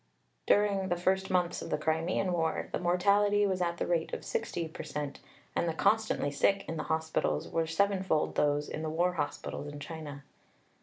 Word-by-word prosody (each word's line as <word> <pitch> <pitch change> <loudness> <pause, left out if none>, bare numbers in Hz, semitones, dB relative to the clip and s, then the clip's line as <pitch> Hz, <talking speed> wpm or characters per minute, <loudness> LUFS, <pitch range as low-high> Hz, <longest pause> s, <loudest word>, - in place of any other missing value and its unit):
During 200 -2 +3
the 175 - +2
first 190 +2 +1
months 180 -2 +1
of - - -6
the - - +1
Crimean 165 +4 0
War 165 -2 0
the - - -1
mortality 200 +4 +3
was 190 -2 0
at 170 -1 0
the - - -1
rate 170 -2 0
of - - -8
60 175 - -2
per - - -7
cent, 145 -1 -5 0.4
and 170 - +1
the 160 - -2
'constantly 215 -8 +2
sick' 195 +8 +2
in 165 - -3
the 155 - -3
hospitals 160 0 0
were 165 -1 0
sevenfold 190 -2 +1
those 145 0 +1
in 155 - -5
the 160 - -2
war 175 +3 +1
hospitals 145 -2 -3
in 145 0 -7
China." 145 -3 -7
170 Hz, 190 wpm, -31 LUFS, 160-190 Hz, 0.4 s, During